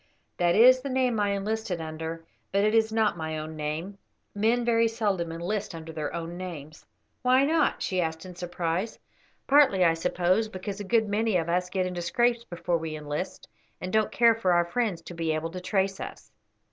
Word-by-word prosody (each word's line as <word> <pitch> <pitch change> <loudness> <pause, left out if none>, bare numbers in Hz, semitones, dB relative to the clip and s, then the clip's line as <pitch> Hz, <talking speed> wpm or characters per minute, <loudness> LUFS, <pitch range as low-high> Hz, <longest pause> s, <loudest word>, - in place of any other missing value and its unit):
"That 175 -1 +3
is 255 +3 +7
the 275 - -4
name 255 -3 +1
I 205 -1 +2
enlisted 200 -2 -2
under, 160 +1 -6 0.3
it 205 +2 +3
is 225 -1 +3
not 220 -4 +1
my 160 0 -3
own 155 +1 -6
name; 155 +6 -4 0.3
men 230 +4 +1
very 230 -1 +3
seldom 205 -7 -1
enlist 175 +3 -3
under 160 0 -8
their 155 -2 -3
own 170 +1 -5
names." 155 -5 -8 0.3
"Why 255 +2 +4
not?" 315 0 +1
she 185 -1 0
asked 160 +1 -3
in 185 - -8
surprise. 175 +3 -3 0.5
"Partly, 275 -10 +5
I 165 - +5
suppose, 180 +5 +1
because 195 +1 -6
a - - -4
good 220 +2 +2
many 210 -1 +1
of 165 -1 -2
us 180 +1 0
get 185 0 0
into 180 -1 -3
scrapes 235 +6 +1
before 175 -4 -2
we 160 -1 -4
enlist, 150 +4 -5 0.3
and 185 0 -5
don't 220 -1 +2
care 235 -1 +5
for 190 -5 +1
our 175 0 +3
friends 185 -2 -1
to 175 - -9
be 165 -2 -1
able 160 +1 -3
to 180 +1 -6
trace 195 0 0
us." - - -8
185 Hz, 195 wpm, -27 LUFS, 165-220 Hz, 0.5 s, is